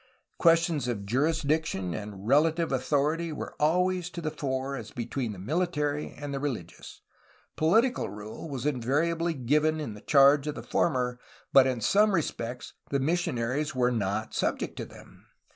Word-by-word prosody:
Questions 165 -5 +3
of 105 -5 -3
jurisdiction 145 - 0
and 105 -1 -7
relative 160 +4 +3
authority 150 +5 0
were 150 - -6
always 180 +3 +2
to 175 - -7
the 155 -2 -3
fore 135 -1 -3
as 115 -5 -7
between 120 0 -3
the 100 - -8
miUtary 150 - -1
and 145 -1 -5
the 135 - -2
religious; 125 - -6 0.5
political 225 +11 +2
rule 105 +9 -8
was 135 -2 -5
invariably 155 +6 0
given 150 +5 +1
in 110 -9 -6
charge 140 0 +6
of 150 - -2
the - - -7
former, 125 -6 0 0.3
but 135 -1 +7
in 125 -3 -1
some 205 - +4
respects 125 -6 -3 0.2
the 140 - 0
missionaries 150 -2 -1
were 125 -1 +2
not 110 -1 -2
subject - - -1
to - - -4
them. - - -16
145 Hz, 150 wpm, -28 LUFS, 125-160 Hz, 0.5 s, but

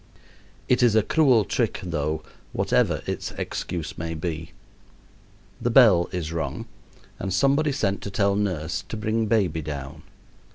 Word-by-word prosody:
It 125 - +3
is 120 -3 +4
a 110 - +5
cruel 130 -6 +4
trick, - - -1
though, 80 -3 -2 0.3
whatever - - +1
its - - -4
excuse 85 -3 -4
may 80 0 -3
be. 80 0 -4 1.1
The 120 - +1
bell 110 -9 +6
is 85 -3 -3
rung 80 - -3 0.5
and 95 - -3
somebody 140 - +3
sent 105 -8 -1
to - - -5
tell 100 0 +1
nurse 85 -5 -2
to 115 - -4
bring 110 +1 0
baby 95 -8 +1
down. 75 0 -6
95 Hz, 140 wpm, -25 LUFS, 80-110 Hz, 1.1 s, bell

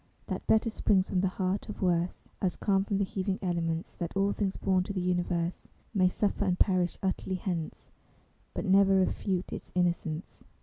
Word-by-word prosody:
That - - -5
Better 220 +1 +3
springs 190 -3 +2
from 180 - +1
the 190 - +2
heart 190 +2 -2
of 210 - -5
Worse, 175 -1 0
As 185 -3 +1
calm 195 -2 +2
from 200 0 -1
the 200 - +2
heaving 190 0 -2
elements; 170 -2 -1
That 170 +2 -3
all 200 +1 +3
things 195 -2 -1
born 185 -1 +2
to 200 - -4
the 190 - -1
Universe 175 -1 -1 0.3
May 185 -3 +4
suffer 205 +2 0
and 180 -3 +1
perish 185 -3 +2
utterly 190 0 -1
hence, 175 -3 -4 0.6
But - - -2
never 195 0 +5
refute 185 -1 0
its - - -7
Innocence. 175 -2 -1
185 Hz, 180 wpm, -30 LUFS, 175-195 Hz, 0.6 s, never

